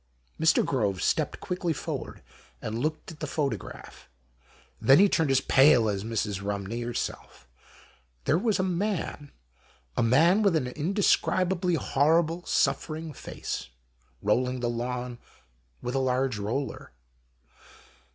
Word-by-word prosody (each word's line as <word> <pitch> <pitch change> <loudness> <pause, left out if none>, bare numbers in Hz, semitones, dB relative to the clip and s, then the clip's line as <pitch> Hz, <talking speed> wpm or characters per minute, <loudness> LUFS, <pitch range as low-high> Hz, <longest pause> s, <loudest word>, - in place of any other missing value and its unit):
Mr. 160 0 +4
Groves 100 -8 0
stepped - - 0
quickly 180 -2 -2
forward - - -6 0.4
and 110 +1 -4
looked 155 +5 -3
at 160 - -13
the 155 - -4
photograph. 135 - -4 0.7
Then 135 +5 +7
he 200 - +7
turned 160 -6 +1
as 135 0 +3
pale 135 -5 +5
as 100 -2 -1
Mrs. 105 -3 -2
Eumney 100 +3 -3
herself. 120 0 -5 0.8
There 155 - +2
was 220 0 +1
a 185 - 0
man, 180 -5 -2 0.6
a - - +1
man 160 - +4
with 200 -5 +3
an 150 -5 +1
indescrib 185 +5 +1
ably 180 -1 0
horrible 165 +4 +2
suffering 155 0 0
face, - - -6 0.6
rolling 125 +5 +1
the 120 -1 -1
lawn 125 +1 -4 0.6
with 125 - -3
a 135 - +1
large 130 -3 0
roller. 120 +7 -4
135 Hz, 130 wpm, -27 LUFS, 120-165 Hz, 0.8 s, Then